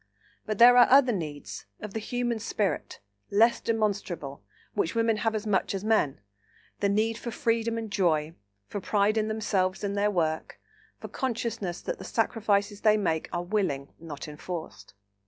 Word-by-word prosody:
But 215 -1 -2
there 245 +2 +8
are 245 - +8
other 260 -1 +6
needs—of 145 - -7
the 220 - -2
human 240 +1 -2
spirit—less 200 - 0
demonstrable, 200 - -2 0.3
which 165 - -1
women 230 -1 +2
have 225 +1 0
as 215 0 -3
much 200 -1 0
as 195 - -4
men: 215 - +1 0.6
the 200 - +2
need 220 +3 +1
for 240 - -5
freedom 230 0 0
and 225 -2 -5
joy, 160 -5 +1 0.3
for 205 - -5
pride 205 +2 +2
in 215 -1 +1
themselves 200 -4 -1
and 200 0 -1
their 205 +1 +2
work, 160 -5 -1 0.4
for - - -7
consciousness 230 -7 -3
that - - -4
the - - -7
sacrifices 205 -2 0
they 215 -1 +5
make 165 -6 -1
are 175 0 -2
willing, 175 -8 -1
not 155 -3 -8
enforced. 150 - -7
205 Hz, 155 wpm, -28 LUFS, 170-225 Hz, 0.6 s, there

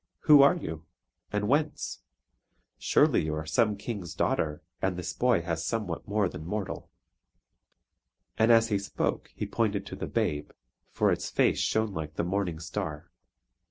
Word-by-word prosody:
Who 150 -3 +8
are 140 +5 +6
you, 80 - -6 0.4
and 105 0 0
whence? 145 +4 0 0.8
Surely - - +3
you 80 0 -1
are 75 0 -4
some 105 +6 +2
King's 100 -5 -5
daughter 75 -1 0 0.2
and 95 -2 0
this 90 -1 -4
boy 120 -9 +2
has 80 -1 -2
somewhat 100 -2 -3
more 100 -1 +1
than 80 -3 -7
mortal." 100 +4 -4 1.5
And 110 +1 +4
as 115 0 +5
he 100 -2 +1
spoke 100 - -2
he - - -3
pointed 105 -3 -1
to - - -7
the - - -5
babe; 75 0 -1 0.4
for - - +2
its - - -1
face - - +2
shone 110 -2 +1
like 80 -3 -5
the - - 0
morning 90 -2 -1
star. 85 -3 -5
100 Hz, 160 wpm, -28 LUFS, 80-110 Hz, 1.5 s, Who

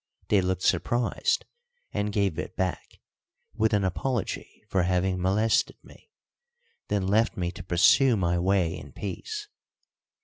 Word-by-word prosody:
They 100 -2 +4
looked 95 0 -1
surprised, 120 +7 +1 0.5
and 105 0 -1
gave 100 -5 0
it - - -5
back, 95 -1 -3 0.6
with 110 -1 +1
an 105 -2 +2
apology 95 +7 -3
for 95 - +1
having 90 +1 0
molested 105 +4 +2
me, - - -18 0.8
then 100 -2 0
left 110 +4 +2
me 90 -2 -1
to 95 +1 -9
pursue 110 - +4
my 85 -2 +1
way 90 -2 +1
in - - -10
peace. 420 - -5
95 Hz, 135 wpm, -27 LUFS, 90-110 Hz, 0.8 s, They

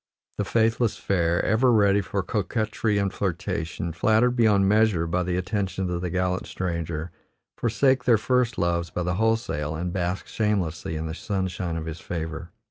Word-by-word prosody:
The 100 - +1
faithless 115 +1 +1
fair, 85 -3 +1
ever 120 +4 +3
ready 100 -2 +4
for 100 0 -2
coquetry 105 +2 -1
and 100 -1 0
flirtation, 85 -2 -3
flattered 110 +7 +3
beyond 105 -5 +4
measure 105 -5 +3
by 85 +2 0
the 90 0 -1
attentions 95 -1 -2
of 85 0 -2
the 90 - -2
gallant 90 +1 -1
stranger, 85 -2 -3 0.4
forsake 130 +2 +2
their 120 -3 +5
first 125 +2 +1
loves 85 -2 0
by 90 - -3
the 90 +1 -1
wholesale, 110 -10 0
and 85 +2 -3
bask 90 +1 -2
shamelessly 95 -7 -1
in 80 +1 -3
the 80 - -4
sunshine 90 -3 -3
of 80 - -4
his 80 0 -6
favor. 80 0 -5
95 Hz, 165 wpm, -25 LUFS, 85-110 Hz, 0.4 s, their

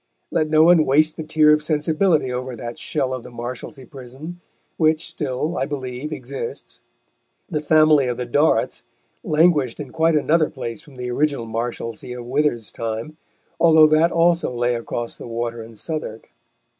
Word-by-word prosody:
Let 155 -2 0
no 155 0 +5
one 170 -1 +6
waste 155 +3 +3
the 160 - -5
tear 155 -1 +4
of 150 - +2
sensibility 155 -1 +1
over 125 0 -4
that 120 +1 -7
shell 135 -4 -2
of 130 - -4
the - - -11
Marshalsea 125 +2 -7
Prison, 140 +7 -10 0.4
which 155 -1 +2
still, 150 +4 -3
I 135 - -1
believe, 135 0 -5
exists. 135 -4 -7 0.7
The 150 - -2
family 155 -2 +4
of 120 -1 -2
the 125 - -3
Dorrits 145 +6 +1 0.4
languished 155 - +2
in 145 -3 -7
quite 160 0 +2
another 155 +1 +2
place 115 -6 -6
from 145 - -17
the 125 -1 -5
original 140 -2 0
Marshalsea 115 +1 -5
of 120 - -8
Wither's 125 -4 0
time, 115 +7 -5 0.4
although 160 -2 +7
that 155 +2 +4
also 170 -3 +2
lay 120 0 0
across 115 0 -4
the - - -9
water 115 0 -4
in 115 0 -11
Southwark. 130 -3 -6
140 Hz, 165 wpm, -21 LUFS, 120-155 Hz, 0.7 s, although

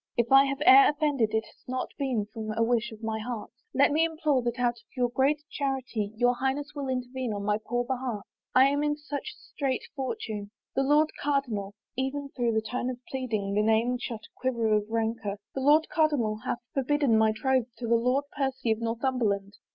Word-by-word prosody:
If 235 +1 +1
I 270 +1 +8
have 275 0 -2
e'er 270 +1 +9
offended 290 -7 +1
it 220 0 +1
has - - -20
not 255 0 -3
been 255 -7 0
from 220 -1 -4
a 230 - +3
wish 235 0 +1
of 220 0 -12
my 220 0 -2
heart's. 230 0 -5 0.2
Let - - +4
me 310 +3 +3
implore 310 -5 +1
that 240 0 -2
out 245 -1 +2
of - - -27
your 245 -1 +2
great 280 +4 +1
charity 260 -7 -2
your 245 +2 +3
Highness 270 +3 -2
will 285 -2 -4
intervene 255 -2 -2
on 200 -1 -4
my 210 +1 +1
poor 245 0 -1
behalf. 245 -5 -3 0.3
I 260 +1 +8
am 285 +1 0
in 295 0 0
such 295 +8 -6
strait 270 -3 -3
fortune! 225 - -4 0.2
The 270 - +1
Lord 295 +3 +3
Cardinal 235 -9 -1
" - - -65
— - - -57
even 285 0 -6
through 240 -4 0
the 220 0 +1
tone 245 +3 -2
of 255 - -4
pleading 220 -7 -2
that 210 - +3
name 225 +3 +2
shot 230 -2 -5
a - - -22
quiver 235 -4 +1
of 210 0 +1
rancor 225 -2 -1
— - - -65
" - - -65
the 270 - -3
Lord 300 +4 +5
Cardinal 295 -9 +1
hath - - -1 0.2
forbidden 275 -2 +2
my 220 0 +4
troth 255 +2 +1
to 240 - -4
the 235 - +3
Lord 250 +4 +2
Percy 265 -4 -1
of 220 - 0
Northimiberland." 230 -4 -1
250 Hz, 215 wpm, -28 LUFS, 225-275 Hz, 0.3 s, e'er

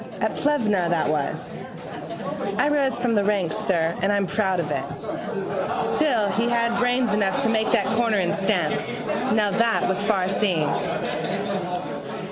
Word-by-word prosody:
At - - 0
Plevna 215 -12 +1
that 170 -3 +1
was. 150 -2 -2 1.0
I 290 - +3
rose 280 -4 +1
from 240 -1 0
the 205 -2 +3
ranks, 200 -5 +1
sir, 170 -3 +1
and 195 +2 +2
I'm 200 -1 +2
proud 190 -2 0
of 150 -3 -2
it. - - -1 1.1
Still 240 -9 +2
he 230 +3 +1
had 235 0 +1
brains 245 -2 +2
enough 200 -2 +1
to - - +2
make 220 -1 +1
that - - +3
corner 230 -2 +2
in 185 0 +1
stamps. 190 -6 0 0.5
Now 210 -2 +2
that 230 +3 +2
was 190 +2 0
farseeing. 190 -5 +1
205 Hz, 145 wpm, -24 LUFS, 185-235 Hz, 1.1 s, I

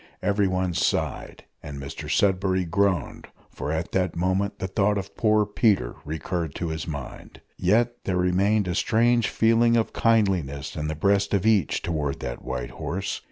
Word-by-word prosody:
Everyone 95 -3 +1
sighed, - - -1 0.2
and 70 -1 -8
Mr 70 0 -7
Sudberry 95 -2 +2
groaned, 95 -3 0 0.2
for 75 - -4
at 80 +1 -3
that 90 -2 0
moment 95 +3 0
the - - -4
thought 100 +2 +1
of 100 0 -6
poor 110 -2 +3
Peter 105 - +1
recurred 80 +1 -4
to 85 - -3
his 80 0 -4
mind. 70 -5 -7 0.2
Yet 115 +6 +1
there 90 -2 0
remained 95 +3 +2
a 90 - -1
strange 120 +4 +2
feeling 115 +1 +3
of 115 - 0
kindliness 90 -12 +1
in 75 0 -3
the 80 - -3
breast 100 +5 +2
of 100 +1 0
each 105 -8 +2
towards 75 -5 -2
that - - -6
white 65 -1 -4
horse. 95 +3 -4
95 Hz, 160 wpm, -25 LUFS, 80-105 Hz, 0.2 s, poor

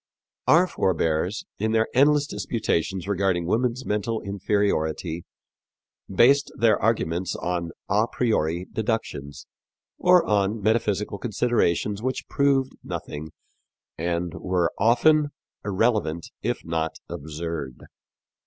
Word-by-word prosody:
Our 170 +3 +6
forebears, 90 - 0
in 110 +2 0
their 110 0 +3
endless 145 +2 +4
disputations 95 - -2
regarding 95 -3 +1
woman's 120 +6 0
mental 105 +2 -1
inferiority, 95 -5 -1 0.9
based 135 +9 +4
their 110 -2 +3
arguments 90 -5 0
on 85 -1 -2 0.2
a 105 +3 +2
priori 90 -7 0
deductions, 110 -11 -3 0.5
or 180 -1 +5
on 105 +1 +1
metaphysical 105 -1 0
considerations 105 -4 0
which 130 +2 -3
proved 135 -2 +2
nothing 75 +2 -6 0.7
and 85 +1 -2
which - - -8
were 90 -2 +1
often 145 +8 +4 0.4
irrelevant, 100 -5 0
if - - -2
not 80 -1 -2
absurd. 75 -3 -6
100 Hz, 105 wpm, -25 LUFS, 85-115 Hz, 0.9 s, Our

